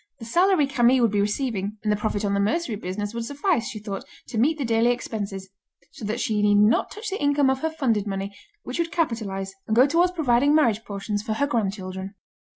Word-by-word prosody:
The 225 - -9
salary 350 - +3
Camille 255 -2 +3
would 230 - +3
be 205 -1 +2
receiving, 210 -1 -2
and 210 - +1
the - - +3
profit 210 0 -2
on 200 - 0
the 200 - +1
mercery 225 +5 0
business 205 +2 -4
would 235 0 -3
suffice, 285 - 0
she - - -6
thought, 205 -2 -5 0.3
to 225 - -2
meet 305 +7 +3
the 280 - -2
daily 230 +1 +3
expenses; 205 -5 -3 0.4
so - - -9
that 220 +4 -2
she 215 -3 0
need 205 0 +4
not 210 +2 +4
touch 430 0 -6
the 390 - -3
income 285 -2 +3
of 265 - -1
her 320 - -1
funded 235 -10 0
money, 195 0 -4 0.3
which - - -5
would 335 0 0
capitalise, 210 - -2
and 220 - +1
go 250 +3 +7
towards 340 +5 +3
providing 285 -3 +3
marriage 230 -8 +3
portions 205 +1 -3
for 215 0 -3
her 285 +6 +1
grandchildren. 195 -5 -3
225 Hz, 220 wpm, -24 LUFS, 205-280 Hz, 0.4 s, go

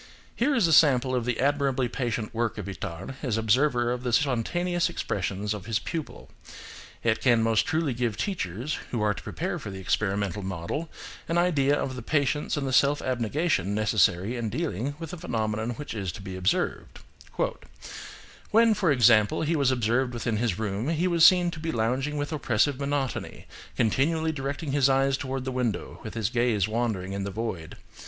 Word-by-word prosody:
Here 275 +4 +2
is 230 -7 +3
a 165 - +3
sample 130 -4 +5
of 125 -2 0
the 125 -2 -1
admirably 135 -2 +1
patient 120 -3 -3
work 115 0 -1
of 105 - -5
Itard 95 +4 -6
as 125 -6 -1
observer 120 +2 +2
of 125 0 -2
the 125 -1 -2
spontaneous 165 +8 +1
expressions 100 +2 -2
of 105 -1 -8
his 110 -1 +1
pupil: 155 +6 -6 0.7
it 110 -1 +1
can 120 -3 +4
most 115 -1 +2
truly 155 -4 0
give 120 -3 -2
teachers, 130 - -3
who 120 - -2
are 105 -1 +2
to - - -9
prepare - - -4
for - - -7
the 95 - -7
experimental 100 +2 -1
method, 95 - -4 0.4
an 165 - +1
idea 145 -5 +3
of 130 - -3
the 125 - -6
patience 145 +3 0
and 140 - -1
the 130 - -2
self 140 +2 +4
ab 130 -1 -1
negation 115 - 0
necessary 105 0 +2
in 115 -2 -2
dealing 140 - -3
with 165 0 -7
a - - -5
phenomenon 110 -5 -2
which 150 -1 -6
is 100 -5 -3
to 95 - -9
be 95 -1 -6
observed: 95 +1 -1 1.5
"When, 225 +1 +5
for 190 -6 +1
example, 120 -2 +4
he 160 +2 +1
was 140 -4 +2
observed 120 0 +1
within 115 -2 -1
his 110 -5 0
room, 110 +4 -2
he 165 +2 +1
was 170 -2 +2
seen 175 0 +7
to 155 - -8
be 160 +1 -2
lounging 130 +6 -1
with 145 +2 -3
oppressive 130 0 +1
monotony, 140 -2 -3 0.3
continually 160 +8 +1
directing 140 +1 -4
his 140 -1 +3
eyes 135 0 +3
toward 130 -1 -4
the 130 - -2
window, 125 -4 -2
with - - -8
his 110 -1 -1
gaze 120 -5 +1
wandering 110 -5 -2
in 100 0 -3
the 100 - -3
void. 95 -6 -5
125 Hz, 185 wpm, -27 LUFS, 110-145 Hz, 1.5 s, seen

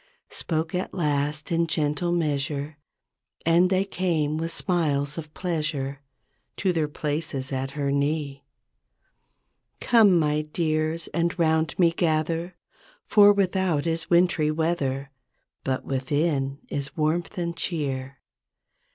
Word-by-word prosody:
Spoke 160 0 -2
at 180 +1 -3
last 150 -2 -1
in 170 0 +2
gentle 155 +2 0
measure 145 -2 -1 0.7
And 170 +2 +4
they 190 +1 +2
came 165 -6 0
with 165 +1 -2
smiles 150 -7 0
of 155 -2 -7
pleasure 150 -6 -2 0.6
To 190 -3 +1
their 160 -3 +1
places 150 -2 -3
at 135 +1 -3
her 140 -1 0
knee. 140 0 -1 1.4
''Come, 215 -7 +5
my 150 -1 +2
dears, 155 +1 -1
and 170 +1 -1
'round 160 -1 +1
me 170 -2 +5
gather 165 +1 0 0.5
For 205 -1 +7
without 190 -6 +1
is 165 0 -2
wintry 170 -3 +3
weather. 150 -4 -1 0.5
But 130 -1 -2
within 135 +1 0
is 140 +1 -4
warmth 160 +4 0
and 170 -1 -2
cheer. 135 -7 -3
155 Hz, 115 wpm, -25 LUFS, 145-170 Hz, 1.4 s, For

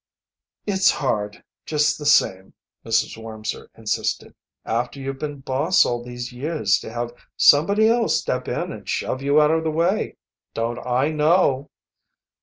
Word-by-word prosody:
"It's 190 -2 +3
hard, 105 -7 -2 0.2
just 150 -1 +1
the 150 - -3
same," 95 -11 +2 0.3
Mrs. 110 0 0
Wormser 110 -1 -6
insisted, 110 -2 -2 0.3
"after 120 +4 -2
you've 135 0 -5
been 145 -2 -5
boss 135 +7 +2
all 120 0 -2
these 120 0 -7
years 130 -6 0
to - - -8
have 120 0 -4 0.2
somebody 200 +9 +5
else 230 0 +2
step - - -3
in - - -3
and - - -9
shove 130 - -2
you 140 +2 +3
out 150 0 +4
of 160 0 +1
the 160 - 0
way. 170 +6 0 0.4
Don't 115 +1 -2
I 125 +4 +1
know!" 150 -3 +2
135 Hz, 150 wpm, -22 LUFS, 120-155 Hz, 0.4 s, somebody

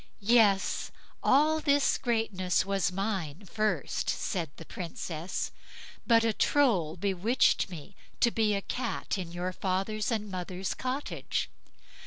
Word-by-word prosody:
"Yes! 205 -5 +3 0.3
all 305 +4 +4
this 285 -2 +3
greatness 220 -8 0
was 195 -1 +1
mine 195 -3 -3
first", 215 +2 -1
said 170 -6 -1
the 165 - -10
Princess, 170 0 -4 0.6
"but 230 -1 +5
a 225 -1 +2
Troll 200 - +2
bewitched 200 +5 +2
me 175 +2 -9 0.2
to 235 - +4
be 215 -2 +2
a 200 - -2
Cat 235 -5 -3
in 175 -2 -5
your 180 +1 -3
father's 195 +4 -1
and 210 -4 -2
mother's 185 +1 -3
cottage. 260 +3 -3
200 Hz, 125 wpm, -29 LUFS, 180-230 Hz, 0.6 s, but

